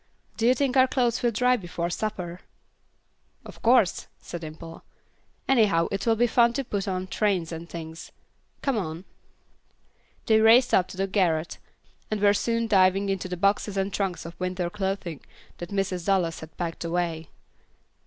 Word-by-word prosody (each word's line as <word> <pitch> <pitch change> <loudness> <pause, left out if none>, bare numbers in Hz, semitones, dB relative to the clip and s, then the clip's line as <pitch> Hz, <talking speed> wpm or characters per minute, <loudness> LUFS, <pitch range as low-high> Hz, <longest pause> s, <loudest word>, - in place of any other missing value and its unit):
Do 230 - +1
you 250 - +5
think 270 0 0
our 260 0 +6
clothes 245 -3 0
will 240 - +3
dry 250 +3 +2
before 175 -4 -4
supper?" 180 -4 -4 1.1
"Of - - -12
course," 230 -6 +3
said 175 - -8
Dimple; 160 +1 -9 0.6
"anyhow 205 -10 +3
it 195 +3 -3
will 225 - +4
be 240 +2 +3
funny 235 0 +3
to 275 - -2
put 205 -5 -3
on 185 -1 -2
trains 185 -4 0
and 165 +1 -7
things. 160 -1 -8 0.5
Come 275 -4 +1
on." 165 0 -5 1.2
They 220 -1 +4
raced 235 +3 +6
up 185 - +4
to 185 - -11
the 195 - +1
garret, 175 -5 0 0.5
and 215 - -1
were 205 0 +5
soon 230 +2 0
diving 195 -1 +3
into 195 -1 -2
the 180 - -4
boxes 200 +1 +1
and 195 +1 -1
trunks 185 -5 -2
of 170 0 -8
winter 180 -1 -2
clothing 190 -6 -3 0.4
that 175 - -6
Mrs. 195 -3 -2
Dallas 180 -4 +1
had 160 0 -12
packed 170 -1 -4
away. 170 -2 -2
195 Hz, 165 wpm, -26 LUFS, 170-220 Hz, 1.2 s, our